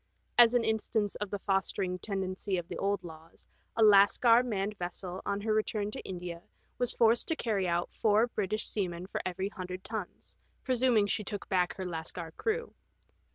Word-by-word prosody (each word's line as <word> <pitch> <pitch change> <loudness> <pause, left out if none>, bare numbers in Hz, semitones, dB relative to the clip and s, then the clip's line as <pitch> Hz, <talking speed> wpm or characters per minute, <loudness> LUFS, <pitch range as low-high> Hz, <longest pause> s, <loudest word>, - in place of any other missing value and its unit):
As 240 0 +7
an 240 - +3
instance 220 -1 0
of 210 - -4
the 205 - -2
fostering 190 -2 -1
tendency 190 0 -2
of 175 -1 -4
the 180 - -6
old 200 -1 0
laws, 165 -1 -12 0.3
a 225 - +3
Lascar 215 +3 +6
manned 210 -4 -2
vessel 180 +1 -4
on 200 0 -1
her 215 +1 0
return 215 -1 -1
to - - -6
India 175 -2 -6 0.4
was 245 -1 +3
forced 230 0 +3
to 325 - +1
carry 205 -9 -1
out 170 0 -1
four 215 0 +3
British 215 -2 -2
seamen 180 -4 -3
for 190 - -4
every 190 +2 -3
hundred 185 -2 -7
tons, 220 -5 -7 0.3
presuming 250 -4 +3
she 210 +1 -1
took 205 +1 -6
back 180 -2 +1
her 190 - -5
Lascar 165 -1 -5
crew. 460 +1 -2
200 Hz, 175 wpm, -31 LUFS, 180-220 Hz, 0.4 s, As